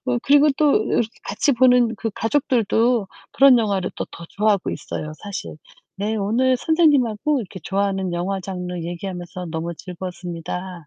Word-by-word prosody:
어 245 -1 +1
그리고 290 +1 +5
또 300 -2 +4
이렇게 240 - +1
그 - - -26
같이 210 +8 0
보는 245 -2 +4
그 225 - -3
가족들도 230 -3 +1 0.2
그런 270 -3 +6
영화를 200 -4 0
또 - - -2
더 170 - -9
좋아하고 205 -2 +1
있어요, 155 - -5
사실. 200 -6 -6 0.4
네 210 +3 -2
오늘 245 +6 +2
선생님하고 290 -4 +2
이렇게 190 -3 -8
좋아하는 195 -2 -1
영화 185 +3 -2
장르 180 -1 -5
얘기하면서 175 0 -6
너무 165 +1 -4
즐거웠습니다. 180 -1 -7
200 Hz, 365 characters per minute, -22 LUFS, 180-245 Hz, 0.4 s, 그런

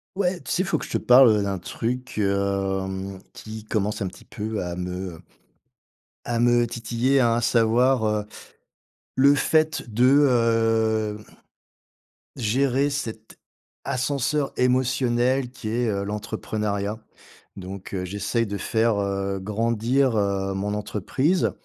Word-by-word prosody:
Ouais, 185 -2 0
tu - - -7
sais, 180 - +1
il - - -1
faut 195 - +1
que - - -6
je - - -11
te - - +1
parle, 125 0 +7
heu, 105 -1 +2
d'un 100 -1 -2
truc, 120 +6 -4
hem, 95 -1 -1 0.2
qui 110 0 -9
commence 105 0 -1
un - - -2
petit 90 - -12
peu 110 -1 -4
à 90 -1 -4
me 90 -1 -5 1.1
à 120 -1 -1
me 120 0 +4
titiller, 120 +4 0
hein, 120 -2 +3
à - - +1
savoir, 120 +2 +3
heu 105 -1 0 0.9
le 140 +2 +5
fait 155 -2 +1
de, 120 +3 +3 0.2
heu, 115 -2 +2 1.2
gérer 135 +4 +1
cet 110 -6 -5 0.5
ascenseur 140 +2 -1
émotionnel 125 0 +1
qui 125 -4 -8
est, 120 +2 0
heu, 100 -1 -1
l'entrepreneuriat. 105 0 -3 0.6
Donc 95 0 -8
heu, 90 -1 -2
j'essaye 105 +5 -1
de 100 0 -4
faire, 110 +3 +1
heu, 100 -1 -2
grandir, 115 +5 +1
heu, 100 -1 0
mon 100 +2 -2
entreprise, 130 - 0
110 Hz, 135 wpm, -24 LUFS, 100-125 Hz, 1.2 s, parle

